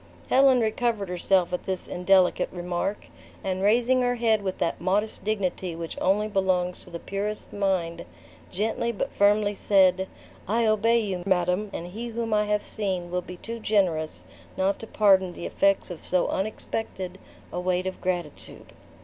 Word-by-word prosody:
Helen 265 -2 +6
recovered 220 -3 0
herself 180 0 +1
at 180 - -3
this 190 -1 -3
indelicate 180 0 +3
remark; 180 +3 -3 0.4
and 190 -1 -2
raising 240 +5 +3
her 245 0 +1
head 225 -3 +2
with 190 -2 -3
that 165 - -1
modest 200 +5 0
dignity 190 -4 -2
which 165 0 -6
only 205 +3 +2
belongs 185 -3 0
to - - -14
the 170 - -5
purest 205 +4 -4
mind, 190 -4 -1 0.4
gently 220 +4 -1
but 215 - -4
firmly 205 0 +3
said, 190 -2 +3 0.4
"I 230 +4 +2
obey 220 +2 +3
you, 190 -4 -3
madam; 180 +2 +1
and 170 - -5
he 220 +7 -6
whom 230 -1 -3
I 210 0 +3
have 210 0 0
seen 185 -5 -3
will 180 0 0
be 180 0 -10
too 230 +5 -6
generous, 180 -8 0 0.3
not 195 +1 +1
to 225 - -8
pardon 190 -5 +3
the 170 - -7
effects 195 -2 +1
of 170 - -8
so 180 -1 +1
unexpected 190 -2 -3 0.3
a 180 - -2
weight 180 0 0
of 190 - -5
gratitude." 175 -5 -5
195 Hz, 165 wpm, -26 LUFS, 180-215 Hz, 0.4 s, Helen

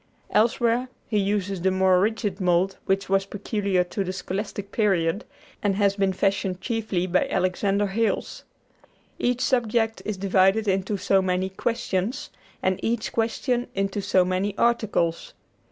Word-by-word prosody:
Elsewhere 235 +2 +2 0.2
he 210 - +1
uses 195 -2 -1
the 190 - +3
more 190 -1 +3
rigid 205 -1 -1
mold 180 +1 +2
which 195 +1 +1
was 195 0 +1
peculiar 200 -2 0
to 195 +3 -3
the 185 - -3
Scholastic 200 +1 -5
Period, 195 -3 +1 0.4
and 200 -2 +1
had 200 -1 +2
been 195 -1 +2
fashioned 190 -1 0
chiefly 215 -4 -1
by 185 0 +1
Alexander 195 +2 +1
Hales. 220 +3 -1 0.8
Each 245 0 0
subject 225 -3 +1
is 215 -2 -3
divided 195 +2 +3
into 195 +1 0
so 195 0 +2
many 185 0 0
"questions," 220 +1 -2 0.3
and 185 0 +1
each 230 0 -1
question 240 +2 0
into 195 +1 -1
so 185 -1 +3
many 185 +2 -1
"articles." 215 -8 0
195 Hz, 140 wpm, -25 LUFS, 185-220 Hz, 0.8 s, the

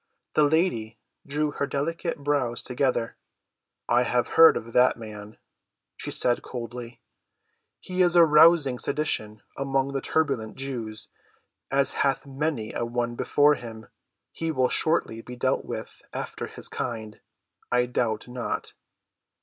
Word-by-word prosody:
The 150 - +4
lady 145 -9 +1 0.3
drew 150 +1 0
her 140 - -2
delicate 165 +5 -2
brows 135 -5 0
together. 125 -2 -1 0.7
"I 120 +1 +4
have 125 0 +1
heard 165 0 +7
of 115 +1 -8
the 125 +1 +6
man," 105 -2 -10 0.6
she - - -6
said 120 -1 +1
coldly. 120 -1 -7 0.8
"He 185 0 -2
is 175 -1 +4
arousing 155 -4 +6
sedition 110 -8 -2
among 135 0 -1
the 135 - -1
turbulent 135 -10 -1
Jews, 120 -6 -5 0.6
as 135 0 +3
hath 140 0 0
many 135 -4 -3
a - - -2
one 120 0 -2
before 145 +4 +3
him. 115 -4 -8 0.4
He 165 0 -3
will 130 -4 +2
shortly 135 -8 0
be 125 +2 -9
dealt 125 - 0
with - - -7
after - - -5
his - - -5
kind, 110 -3 -5 0.5
I 125 0 +3
doubt 120 -3 -1
not." 125 -1 -4
125 Hz, 135 wpm, -26 LUFS, 115-145 Hz, 0.8 s, heard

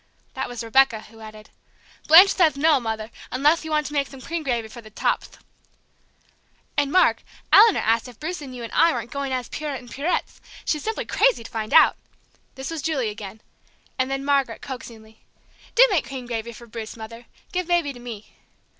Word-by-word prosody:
That 265 -1 -4
was 245 -1 -6
Rebecca, 230 -1 +3
who 225 0 -16
added, 215 -1 -12 0.6
"Blanche 370 +5 +9
theth 320 -6 +3
no, 300 0 +4
Mother, 220 -1 -4 0.2
unleth 295 +7 +2
you 315 - -6
want 305 -1 +1
to 295 - -6
make 280 -2 0
thom 270 - -12
cream 335 +5 -4
gravy 240 -6 -2
for 235 +2 -11
the 215 - -14
chopth!" 215 - -2 1.4
"And, 285 -1 +1
Mark, 365 +2 +4 0.3
Eleanor 435 +1 +7
asked 225 +2 +1
if 245 -3 -14
Bruce 340 +2 -4
and 260 -3 -8
you 240 - -7
and 230 - -7
I 335 - +4
weren't 240 - -5
going 280 0 -3
as 255 -2 -2
Pierrot 295 -4 -4
and 245 -1 -15
Pierettes; 305 +6 -2 0.2
she's 300 - 0
simply 445 0 -3
crazy - - +2
to 225 - -11
find 220 -2 -4
out!" 320 - +6 0.6
This 265 +3 -6
was 325 -2 -4
Julie 275 -7 -1
again; 210 0 -9 0.6
and 260 0 +1
then 270 0 -3
Margaret, 275 -5 0
coaxingly, 225 -4 -10 0.5
"Do - - +8
make 360 -6 +1
cream 265 -2 -7
gravy 235 -1 -4
for 235 +1 -12
Bruce, 225 0 -8
Mother. 230 +2 -10 0.2
Give 365 -3 -2
Baby 345 -5 +1
to 245 - -12
me!" 230 -4 -9
265 Hz, 195 wpm, -23 LUFS, 230-305 Hz, 1.4 s, Blanche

